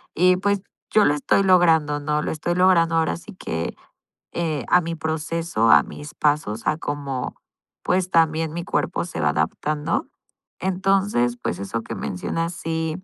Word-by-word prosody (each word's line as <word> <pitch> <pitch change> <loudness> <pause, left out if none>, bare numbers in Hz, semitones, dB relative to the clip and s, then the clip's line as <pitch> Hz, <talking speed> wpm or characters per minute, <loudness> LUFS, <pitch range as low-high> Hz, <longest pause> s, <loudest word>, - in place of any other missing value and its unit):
y, 180 +2 +4
pues, 200 +1 0 0.3
yo 215 -1 +5
lo 145 - +4
estoy 150 +6 +2
logrando, 165 -5 +4
¿no?, 150 +1 -1
lo - - -2
estoy 175 +3 -2
logrando 175 -3 +4
ahora 160 - +1
sí 200 +5 -12
que, 80 - -4 0.6
eh, 155 -7 -2
a 180 - +5
mi 170 0 -4
proceso, 160 -6 0
a - - +8
mis 150 0 -10
pasos, 145 -8 0
a 155 - +2
cómo 140 -4 -4 0.5
pues 185 0 +1
también 160 -1 +2
mi 170 +1 -4
cuerpo - - -1
se 175 - -6
va 75 - +3
adaptando. 150 - -1 0.5
Entonces, 190 -9 +1
pues - - -2
eso 100 +4 -3
que - - -6
mencionas, 165 - -3
sí 165 +1 -3
160 Hz, 160 wpm, -23 LUFS, 145-175 Hz, 0.6 s, a